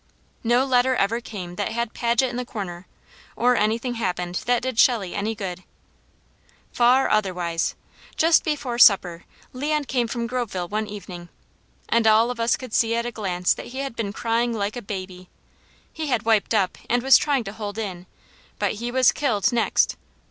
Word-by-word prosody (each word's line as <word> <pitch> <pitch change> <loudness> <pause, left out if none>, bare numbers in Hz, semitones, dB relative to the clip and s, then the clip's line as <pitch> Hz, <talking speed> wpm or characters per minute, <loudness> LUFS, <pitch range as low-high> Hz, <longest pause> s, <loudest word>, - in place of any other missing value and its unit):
No 240 +3 +3
letter 255 0 +3
ever 230 +2 0
came 180 -6 -8
that 205 - -2
had 235 -1 -2
Paget 235 +2 +1
in - - -7
the 250 - -2
corner, 185 -6 -7 0.5
or 245 +1 +3
anything 230 +3 0
happened 180 -5 -3
that 245 -1 +2
did 255 -3 -2
Shelley 215 -8 +3
any 215 +2 -2
good. 185 -3 -5 1.1
Far 250 +2 +4
otherwise! 180 -5 0 0.4
Just 325 +1 +4
before 270 -6 -2
supper 180 -7 +5 0.3
Leon 295 +3 -1
came 245 -3 0
from 235 0 -3
Groveville 235 -8 -3
one 215 +1 -2
evening, 180 -4 -9 0.6
and 230 -1 +2
all 220 +2 +5
of 245 - -7
us 230 0 +2
could 255 -4 -10
see 230 0 +2
at 235 0 -1
a 240 - -3
glance 180 -5 0
that - - -9
he 250 +2 -9
had 275 -4 -5
been 220 -4 -3
crying 230 +2 0
like 205 -1 -2
a 245 - -5
baby. 185 -3 -7 0.6
He 315 -1 -4
had 245 -6 0
wiped 225 0 +2
up, 195 -4 0
and 245 +1 +1
was 270 0 +7
trying 280 -5 0
to 195 -1 -7
hold 210 -1 -6
in, 185 -5 -5 0.5
but - - 0
he 240 - -2
was 255 -1 +4
killed, 245 -4 0
next. 235 -2 +1
230 Hz, 180 wpm, -23 LUFS, 200-245 Hz, 1.1 s, was